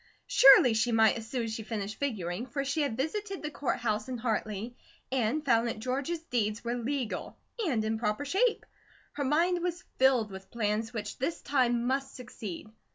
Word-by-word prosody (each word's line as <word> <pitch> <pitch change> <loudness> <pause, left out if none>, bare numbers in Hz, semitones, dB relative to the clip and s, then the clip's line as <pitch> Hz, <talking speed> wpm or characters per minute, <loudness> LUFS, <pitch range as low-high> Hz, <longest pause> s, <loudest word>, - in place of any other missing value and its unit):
Surely 265 -3 +8
she 220 +2 +1
might 220 -2 +5
as 225 -1 -6
soon 250 -3 -1
as 225 -1 -3
she 220 - -4
finished 215 -1 -4
figuring, 215 -5 -2
for 275 +3 -3
she 280 +3 0
had 275 -6 -1
visited 390 +7 -3
the 300 - -3
Court 285 - -1
House 215 0 -1
in 255 - -3
Hartley 220 0 -2 0.4
and 265 +4 0
found 230 +1 +3
that 230 - -3
George's 270 +8 -2
deeds 225 -7 -1
were 235 0 -1
legal, 245 0 -3 0.3
and 230 -8 0
in 220 0 -1
proper 210 +5 -1
shape. 435 - +1 0.5
Her 285 - -3
mind 340 +6 +2
was 350 0 -3 0.2
filled 255 -5 +4
with 190 0 -10
plans 220 0 -1
which 210 -3 -5
this 295 +6 -1
time 240 -4 +2
must 270 +1 -1
succeed. 220 -5 -8
240 Hz, 185 wpm, -30 LUFS, 220-280 Hz, 0.5 s, Surely